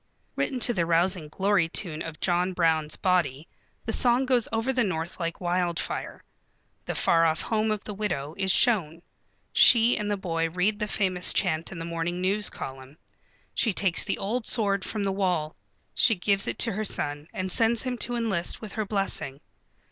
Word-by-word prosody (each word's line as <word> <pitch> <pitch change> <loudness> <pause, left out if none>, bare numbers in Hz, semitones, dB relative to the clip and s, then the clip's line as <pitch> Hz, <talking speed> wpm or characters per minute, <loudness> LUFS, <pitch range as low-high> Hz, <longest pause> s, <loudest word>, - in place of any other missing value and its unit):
Written 260 - -2
to 240 - +3
the 170 -5 -1
rousing 170 0 +1
glory 190 +1 +1
tune 165 -3 0
of 160 -1 -7
John 180 +1 0
Brown's 160 -3 +1
Body 170 -6 0 0.4
the 225 - -2
song 245 +3 +3
goes 250 -3 +2
over 225 +4 -1
the 255 -1 +2
North 170 -3 -4
like 170 -1 -3
wildfire. 175 -1 -2 0.6
The - - -3
far 165 0 +3
off 160 0 -1
home 220 -1 0
of 215 -1 -2
the 210 - -7
widow 175 -8 -3
is 190 -1 0
shown. 170 -8 +2 0.5
She 235 0 +6
and 210 -1 -3
the 205 - -1
boy 165 -3 -2
read 190 +5 0
the 210 - -2
famous 185 -4 +1
chant 165 -4 0
in 180 - -8
the 165 - -5
morning 170 +1 -3
news 200 +3 +1
column. 135 +2 -9 0.6
She 225 - +1
takes 185 -2 +2
the - - -2
old 220 +4 -3
sword 200 -4 +2
from 210 +1 -3
the 195 - 0
wall. 180 -5 -1 0.4
She 225 - +4
gives 195 +2 0
it - - -3
to 230 - -1
her 215 +3 -3
son 145 -6 -2
and 185 -4 -4
sends 225 +3 +2
him 255 -1 -2
to 245 - -1
enlist 210 -7 +1
with 215 -3 -9
her 215 - -2
blessing. 195 -9 0
185 Hz, 185 wpm, -26 LUFS, 165-215 Hz, 0.6 s, She